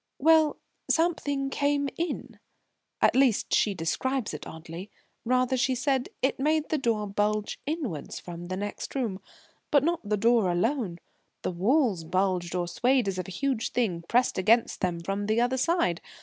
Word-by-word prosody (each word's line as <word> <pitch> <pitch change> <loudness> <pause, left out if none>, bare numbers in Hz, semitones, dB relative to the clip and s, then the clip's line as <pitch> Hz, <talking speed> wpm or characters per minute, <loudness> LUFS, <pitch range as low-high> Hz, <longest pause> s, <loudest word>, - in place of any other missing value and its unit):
"Well 315 +1 +4 0.3
something 285 -5 +1
came 285 0 +1
in. 340 0 -4 0.6
At - - +5
least, 260 -5 +3
she 205 -2 +3
describes 255 +9 -1
it - - -7
oddly, 165 +4 -8 0.4
rather; 255 +1 +2
she 260 0 +1
said 260 0 0
it 265 - +1
made 305 +2 +1
the 310 - +1
door 225 -5 0
bulge 210 +1 -1
inwards 280 - -3
from 175 0 -8
the 185 +1 -3
next 205 +6 -5
room, 220 -8 -2 0.5
but 285 -3 +4
not 340 +2 +1
the 210 0 0
door 225 -2 +3
alone; 200 0 0 0.5
the - - -1
walls 205 - +2
bulged 180 0 0
or 175 -1 -1
swayed 250 +5 +2
as 190 -1 -2
if 180 - -4
a - - -7
huge 245 +4 -1
thing 195 -9 0
pressed 245 -4 +2
against 225 +5 +3
them 175 -2 -1
from 195 +3 -3
the 220 +2 +2
other 245 +2 +1
side. 265 - +1
230 Hz, 165 wpm, -27 LUFS, 185-275 Hz, 0.6 s, At